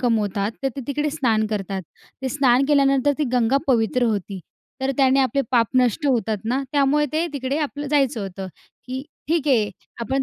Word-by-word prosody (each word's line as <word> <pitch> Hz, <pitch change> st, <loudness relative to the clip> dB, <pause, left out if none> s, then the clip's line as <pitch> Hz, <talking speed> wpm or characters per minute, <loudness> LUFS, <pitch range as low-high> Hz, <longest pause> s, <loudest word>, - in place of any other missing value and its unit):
कमवतात. 215 Hz, -4 st, 0 dB
तर 270 Hz, -, +2 dB
ते 275 Hz, -, -3 dB
तिकडे 295 Hz, +1 st, -1 dB
स्नान 230 Hz, -8 st, +1 dB
करतात. 195 Hz, -3 st, -3 dB, 0.4 s
ते 265 Hz, -, -1 dB
स्नान 260 Hz, -1 st, +3 dB
केल्यानंतर 275 Hz, -1 st, +3 dB
ती 300 Hz, -, +1 dB
गंगा 250 Hz, +1 st, +3 dB
पवित्र 245 Hz, -1 st, +2 dB
होती. 200 Hz, -4 st, -2 dB, 0.4 s
तर 265 Hz, -, +1 dB
त्याने 270 Hz, 0 st, +4 dB
आपले 265 Hz, +1 st, +1 dB
पाप 235 Hz, -2 st, +4 dB
नष्ट 255 Hz, +4 st, +2 dB
होतात 225 Hz, -5 st, +1 dB
ना. 255 Hz, +5 st, 0 dB
त्यामुळे 290 Hz, +1 st, +3 dB
ते 320 Hz, +2 st, +1 dB
तिकडे 275 Hz, 0 st, -2 dB
आपलं 290 Hz, -1 st, -3 dB
जायचं 275 Hz, -5 st, +1 dB
होतं 195 Hz, -1 st, -6 dB, 0.4 s
की 260 Hz, +1 st, -4 dB, 0.3 s
ठीक 315 Hz, -2 st, +1 dB
आहे 225 Hz, -6 st, +3 dB, 0.3 s
आपण 265 Hz, +4 st, -1 dB
260 Hz, 175 wpm, -22 LUFS, 225-280 Hz, 0.4 s, त्याने